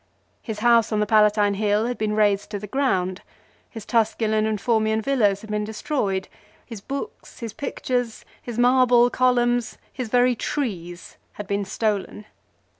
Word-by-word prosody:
His 215 -3 -6
house 235 -1 +4
on 215 - 0
the 210 - +2
Palatine 210 -1 +3
Hill 210 +2 +1
had 245 +1 -2
been 210 -1 -1
rased 205 -2 +2
to 210 - -4
the 205 - -7
ground. 190 -7 -1 0.5
His 225 -3 -9
Tusculan 220 -2 +1
and 215 -1 -1
Formian 220 -1 +1
villas 215 -5 +1
had 220 - -9
been 210 0 -1
destroyed. 210 -3 -2 0.4
His 225 -5 -9
books, 275 - -7
his 230 -3 -6
pictures, 245 -3 -3 0.2
his 240 -2 -7
marble 245 -1 +4
columns, 245 -2 +1 0.2
his 255 -4 -5
very 245 +1 +3
trees 185 - -5 0.2
had 210 - -7
been 200 0 -2
stolen. 205 +1 -2
220 Hz, 155 wpm, -23 LUFS, 210-245 Hz, 0.5 s, house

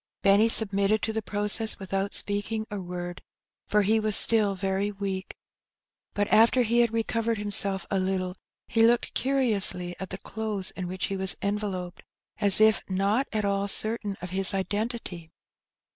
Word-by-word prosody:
Benny 200 +3 +4
submitted 205 -1 +3
to 220 - -2
the 220 - -2
process 210 +1 +2
without 195 +1 -3
speaking 210 +2 -1
a 205 -2 -5
word, 175 0 -7 0.5
for 210 0 +2
he 220 +3 +2
was 215 -1 +3
still 210 -3 +4
very 195 +1 -2
weak; 195 -2 -5 0.8
but 205 0 0
after 235 +3 +4
he 235 +1 +1
had 235 -2 +3
recovered 230 0 -1
him 205 0 -4
self 195 -3 +3
a 195 - +1
little, 185 -1 -2 0.3
he 225 - 0
looked 235 +1 +2
curiously 210 -9 0
at 190 - -6
the - - -6
clothes 210 -2 -5
in 185 -2 -6
which 185 +1 -3
he 195 - -4
was 190 -1 +1
enveloped, 200 -3 -4 0.4
as 200 -1 +5
if 220 0 +4
not 200 +8 0
at 215 -2 -2
all 200 0 -1
certain 210 -1 -2
of 180 - -6
his 195 +1 +3
identity. 205 -4 -4
205 Hz, 165 wpm, -26 LUFS, 190-220 Hz, 0.8 s, as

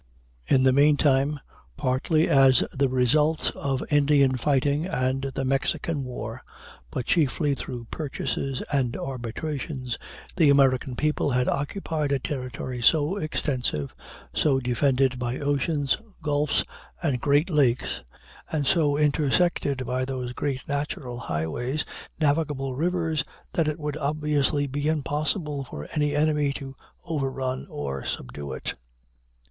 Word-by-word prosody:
In 130 -1 +4
the 130 - +6
meantime, 145 0 +4 0.4
partly 145 +4 +2
as 135 -2 +6
the 135 0 +2
results 150 +5 +2
of 135 -2 -2
Indian 140 -2 +4
fighting 145 +4 +1
and 130 -5 0
the 135 - -1
Mexican 135 +3 0
war, 125 -1 -6 0.5
but 115 - -3
chiefly 150 -1 +2
through 125 -3 -5
purchases 135 -2 -3
and 130 -4 +1
arbitrations, 130 +1 -4 0.4
the 160 -5 +5
American 135 -2 +3
people 150 +1 +1
had 125 -1 +1
acquired 150 0 -1
a 140 - +3
territory 125 -2 -4
so 155 - +4
extensive, 125 - -1 0.4
so 135 -3 +3
defended 130 +1 +1
by 125 +1 -2
oceans, 145 0 +1 0.3
gulfs, 150 -1 +1 0.4
and 135 -7 0
great 145 +5 +3
lakes, 130 - +2 0.5
and 150 -3 0
so 145 0 +3
intersected 145 -2 +2
by 125 +1 -1
those 130 -2 -3
great 130 -1 -3
natural 140 -4 -3
highways, 120 - -2 0.3
navigable 145 -3 +1
rivers, 160 0 0 0.3
that 165 -2 +1
it 155 - -1
would 150 -1 -3
obviously 150 -1 +1
be 145 +2 -2
impossible 150 0 0
for 75 - -8
any 150 -1 +1
enemy 150 -1 +2
to 135 -1 -7 0.3
overrun 135 -5 -2
or 70 -2 -4
subdue 70 +2 -5
it. 65 - -3
140 Hz, 125 wpm, -26 LUFS, 130-150 Hz, 0.5 s, the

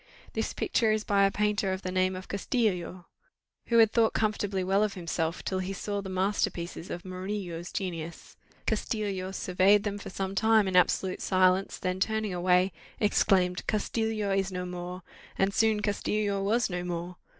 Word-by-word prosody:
This - - -1
picture 225 -3 +1
is 215 0 0
by 200 -1 +3
a 195 - +2
painter 210 -1 0
of 190 +1 -3
the 185 - -3
name 185 0 +1
of 185 +1 -8
Castillo, 190 -4 -1 0.6
who 235 - +3
had 225 -2 +6
thought 225 -1 +3
comfortably 205 -3 0
well 195 +2 +2
of 210 -2 0
himself, 170 -1 -2
till 190 - -1
he 185 +1 -3
saw 205 +1 -3
the 195 - -7
master 190 +2 +1
pieces 170 0 -7
of 175 +2 -6
Murillo's 185 -2 -5
genius; 170 -4 -5 0.3
Castillo 205 -4 -1
surveyed 190 +2 +3
them 205 -1 -3
for - - -8
some 190 0 -3
time 220 +1 +4
in 190 - -1
absolute 185 +1 +2
silence, 185 0 +2
then 185 0 -2
turning 220 0 0
away, 180 +1 +3 0.3
exclaimed 185 -4 +2
Castillo 215 -1 -1
is 195 0 +1
no 180 -1 -3
more! 180 0 -6 0.3
and 195 +1 +2
soon 220 -1 +2
Castillo 205 -1 0
was 220 +4 +2
no 180 -2 -3
more. 175 0 -4
195 Hz, 170 wpm, -29 LUFS, 180-210 Hz, 0.6 s, had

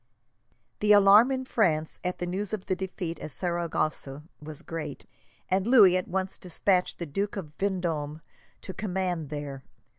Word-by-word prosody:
The 210 0 +5
alarm, 205 +5 +7
in 260 -1 -2
France, 160 -11 +1
at 180 0 -2
the 175 - -3
news 195 +4 -3
of 200 -3 -3
the 185 - 0
defeat 180 -2 -5
at - - -6
Saragossa 155 -4 -2 0.2
was 150 -1 -6
great, 150 -4 -6 0.4
and 190 +2 +1
Louis 210 -8 +7
at 185 - -1
once 190 +1 -3
despatched 180 +1 0
the 170 - -4
Duke 195 +7 -2
of 155 -6 -6
Vendome 165 -6 -2 0.4
to 190 - -6
command 180 -6 -2
there. 145 -2 -5
180 Hz, 155 wpm, -28 LUFS, 155-195 Hz, 0.4 s, alarm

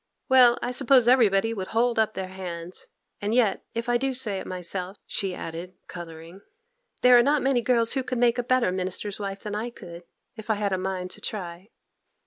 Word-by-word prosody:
'Well, 250 -2 +6
I 245 - -1
suppose 255 -1 +4
everybody 225 -3 +4
would 190 -4 -5
hold 235 -1 +2
up 220 0 +1
their 190 -1 -4
hands; 180 -2 -7 0.3
and 210 +3 -1
yet 220 -6 +2
if 230 +1 -3
I 240 0 +3
do 270 +1 -2
say 215 -7 -2
it - - -8
myself,' 185 +1 -5
she 190 -2 -2
added, 170 +3 -7
colouring, 170 +1 -10 0.6
'there 250 -1 +8
are - - +7
not 285 +4 +2
many 265 -2 +2
girls 235 -1 +2
who 270 - 0
could 255 -1 -4
make 240 0 +3
a - - 0
better 250 -5 +2
minister's 185 +2 -4
wife 195 -1 -5
than 210 -1 -5
I 220 +3 -3
could 170 -7 -11 0.3
if 220 -1 -11
I 220 - +3
had 200 -1 -1
a - - +1
mind 185 -1 -3
to - - -9
try. 180 -1 -6
210 Hz, 205 wpm, -25 LUFS, 185-240 Hz, 0.6 s, there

